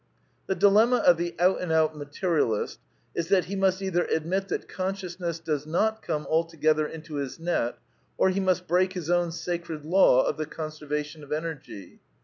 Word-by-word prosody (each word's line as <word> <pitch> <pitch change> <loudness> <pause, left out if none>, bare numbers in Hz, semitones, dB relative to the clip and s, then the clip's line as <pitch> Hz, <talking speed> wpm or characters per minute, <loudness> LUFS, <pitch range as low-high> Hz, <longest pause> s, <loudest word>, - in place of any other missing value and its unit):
The 190 - 0
diji^ama 210 +6 +5
of 175 - +6
the 170 0 -3
out 180 +2 +3
and 180 -3 -2
out 160 -1 +3
Materia 150 +3 0
list 110 -3 -2 0.3
is 170 - -2
that 190 -1 +3
he 200 - -5
must 190 -1 +2
^jthgy 180 -2 0
admit 185 +5 -1
that - - -3
consciousness 185 -3 -3
does 155 -3 -3
not 220 +7 +1
come 155 -6 -2
al 160 +1 +3
to^^ether 155 -2 +1
into 155 -2 -7
his 140 +2 -4
net, 165 -8 -1 0.4
or - - +4
he 190 - -1
must 185 -1 +1
break 185 +2 +2
his 175 -3 -3
own 175 -1 +2
sacred 165 -2 -4
law 165 -6 +5
of - - -1
the 155 -1 -3
conservation 150 -1 -5
of 140 - -13
Energy. 150 - -5
170 Hz, 185 wpm, -27 LUFS, 155-185 Hz, 0.4 s, of